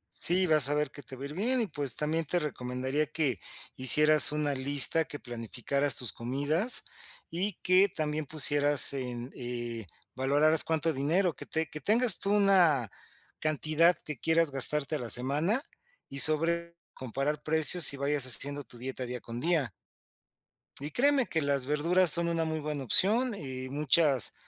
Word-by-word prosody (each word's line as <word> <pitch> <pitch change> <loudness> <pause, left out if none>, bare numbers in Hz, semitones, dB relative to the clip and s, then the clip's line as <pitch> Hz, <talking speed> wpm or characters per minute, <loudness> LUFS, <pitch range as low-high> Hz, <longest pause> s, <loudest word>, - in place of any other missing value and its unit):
Sí, 185 +2 +4
vas 155 -4 +6
a 145 - -2
ver 150 -2 -3
que 145 - -12
te 130 0 -11
va 130 - -12
a - - -6
ir 145 - -10
bien 245 +8 -3
y, - - -2
pues, 145 -6 -3
también 160 +2 -3
te 175 +5 -2
recomendaría 130 -1 -5
que 145 - -4 0.4
hicieras 150 +4 +5
una 150 -1 -3
lista, 140 +4 +3
que 145 +2 -9
planificaras 120 +4 -2
tus 125 -4 -1
comidas, 145 - 0 0.5
y 190 +5 -4
que 185 +2 +2
también 155 -2 -5
pusieras 145 -2 +3
en, 125 -1 -7
eh 120 -4 -8 0.3
valoraras 145 +4 +1
cuánto 160 0 -3
dinero 165 +6 -2
que - - -10
te 160 0 -4
que 155 - -9
tengas 230 0 +4
tú 200 - -3
una 180 - +1 0.5
cantidad 155 +3 0
que 150 -5 -8
quieras 165 -1 +1
gastarte 140 +2 +3
a - - -11
la 120 -2 -8
semana, 150 - -2 0.5
y 140 - -2
sobre 170 +3 +3 0.2
comparar 135 +4 -6
precios 160 +1 +5
y 140 - -9
vayas 140 -1 0
haciendo 145 +3 -1
tu 120 -1 -14
dieta 130 0 -8
día 125 0 -7
con 115 +1 -10
día. 155 - -2 1.1
Y 145 - -7
créeme 270 - 0
que 160 - -3
las 140 -2 -2
verduras 170 +4 +1
son 170 +2 +5
una 165 -1 -3
muy 160 0 -5
buena 150 -2 -7
opción, 220 - +1
eh, 130 -6 -9
muchas 145 - 0
150 Hz, 170 wpm, -27 LUFS, 135-165 Hz, 1.1 s, vas